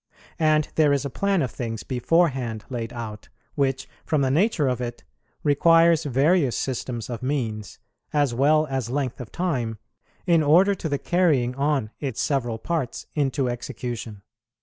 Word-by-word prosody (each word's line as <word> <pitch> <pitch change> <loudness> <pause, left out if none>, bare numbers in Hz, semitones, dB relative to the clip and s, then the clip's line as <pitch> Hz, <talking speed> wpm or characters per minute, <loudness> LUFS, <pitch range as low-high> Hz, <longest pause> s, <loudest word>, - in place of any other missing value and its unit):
And 155 -1 +3
there 155 -2 +4
is 140 0 +1
a 140 - -4
plan 200 0 +1
of 130 - -3
things 115 -3 -5
beforehand 130 -4 0
laid 120 -2 -4
out, 110 -3 -7 0.2
which, 135 -2 -1 0.2
from 155 -3 0
the 130 -1 +2
nature 160 - +2
of 125 -1 -1
it, 120 -1 -5 0.4
requires 165 +2 +4
various 140 +1 +2
systems 125 -3 -3
of 120 -1 -5
means, 115 -6 -3 0.3
as 145 -4 +1
well 150 +5 +3
as 135 -5 -3
length 130 -1 -2
of 120 - -9
time, 130 -11 -2 0.5
in 170 -2 +4
order 175 +7 +5
to 175 -4 -4
the 140 - 0
carrying 145 -8 +2
on 140 -4 0
its 135 -6 -4
several 120 -5 0
parts 155 0 -3
into 140 -2 0
execution. 120 -3 -5
135 Hz, 155 wpm, -24 LUFS, 120-155 Hz, 0.5 s, order